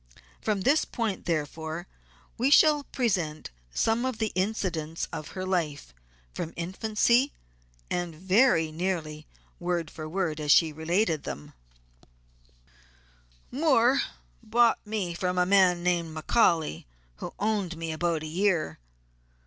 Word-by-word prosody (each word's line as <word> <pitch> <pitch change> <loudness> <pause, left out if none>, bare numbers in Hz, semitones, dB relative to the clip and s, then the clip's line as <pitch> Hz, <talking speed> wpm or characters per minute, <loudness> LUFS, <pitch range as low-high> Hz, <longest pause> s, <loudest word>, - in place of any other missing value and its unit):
From 210 -3 0
this 285 +10 +3
point, 225 -6 -3
therefore, 160 +1 -3 0.5
we 250 +4 +1
shall 295 0 +5
present 180 - -2 0.2
some 225 - +1
of 260 -3 -2
the 220 -1 -1
incidents 180 -5 -2
of 155 - -5
her 185 - -3
life, 160 - -2 0.4
from 165 - -5
infancy, 220 +9 +1 0.5
and 175 -2 -3
very 185 -1 +3
nearly 155 -3 -3 0.3
word 175 -2 -2
for 155 -1 -7
word 165 -3 -1
as 150 -1 +1
she 160 0 +5
related 165 +1 0
them: 75 - -7 2.0
"Moore 265 -3 +3 0.4
bought 235 0 +3
me 205 -5 -2
from 180 +1 -2
a 180 - +4
man 180 -2 +4
named 170 -3 0
McCaully, 160 - +2 0.3
who - - -7
owned 200 -5 -1
me 165 0 -4
about 160 0 -1
a - - -5
year. 170 - 0
180 Hz, 125 wpm, -27 LUFS, 160-215 Hz, 2.0 s, shall